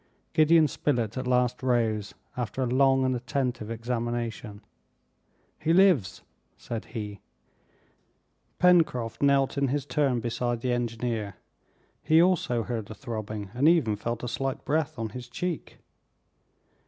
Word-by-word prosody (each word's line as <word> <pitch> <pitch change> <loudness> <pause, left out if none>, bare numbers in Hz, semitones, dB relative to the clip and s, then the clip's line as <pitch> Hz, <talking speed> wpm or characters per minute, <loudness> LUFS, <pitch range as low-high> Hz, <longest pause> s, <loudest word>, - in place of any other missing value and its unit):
Gideon 155 0 +5
Spilett 120 -8 -1
at 130 -1 -3
last 125 -1 +1
rose, 115 -5 0 0.2
after 125 +2 -2
a - - +1
long 135 +1 +3
and 130 -1 +1
attentive 125 -3 -2
examination. 115 -2 -4 1.0
"He 165 - +1
lives!" 175 - +3 0.3
said 115 -2 -6
he. 105 -3 -6 1.4
Pencroft 160 -11 +3
knelt 140 0 +3
in 140 - +2
his 140 +1 -1
turn 130 -2 +1
beside 120 0 -2
the 125 0 0
engineer, 115 -4 -2 0.7
he 160 +1 +4
also 165 -10 +2
heard 110 -2 -4
a 110 - -7
throbbing, 110 -5 -6
and 130 +5 +2
even 150 -11 +3
felt 115 +3 -4
a - - -2
slight 135 +2 -3
breath 155 0 0
on 115 -1 -3
his 120 +2 -9
cheek. 175 +6 -4
125 Hz, 130 wpm, -27 LUFS, 115-140 Hz, 1.4 s, Gideon